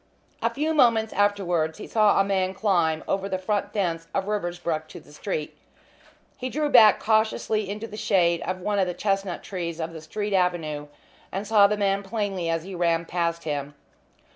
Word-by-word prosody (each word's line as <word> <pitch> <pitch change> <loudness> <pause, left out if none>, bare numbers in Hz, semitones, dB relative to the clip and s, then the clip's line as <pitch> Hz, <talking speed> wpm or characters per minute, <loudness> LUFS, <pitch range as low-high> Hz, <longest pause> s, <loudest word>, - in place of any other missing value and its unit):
A - - +2
few 310 +2 -1
moments 230 -6 +3
afterwards 180 -6 +1
he - - -8
saw 215 -3 +3
a - - +5
man 190 -1 0
climb 170 -6 +1
over 195 0 -1
the 185 - -1
front 205 +2 -2
fence 165 -5 -2
of 195 - 0
Riversbrook 175 -6 -2
to - - -10
the 145 - -18
street. 155 -1 -4 0.8
He 255 - -3
drew 300 +2 -1
back 225 -6 +7
cautiously 220 -1 +1
into 210 +2 -4
the 210 -2 -9
shade 185 -5 +2
of 185 0 -4
one 205 +2 0
of 190 - +2
the 180 - -3
chestnut 195 -3 -1
trees 170 -3 -5
of 165 0 -4
the 160 - -8
street 205 +6 -4
avenue, 165 -5 0 0.4
and 195 +3 -3
saw 205 -1 +6
the 210 +1 -1
man 200 -1 +1
plainly 195 -4 -2
as 165 -1 -1
he 190 +2 -8
ran 170 -1 +1
past 170 -1 -2
him. 145 -2 -4
195 Hz, 190 wpm, -25 LUFS, 170-210 Hz, 0.8 s, back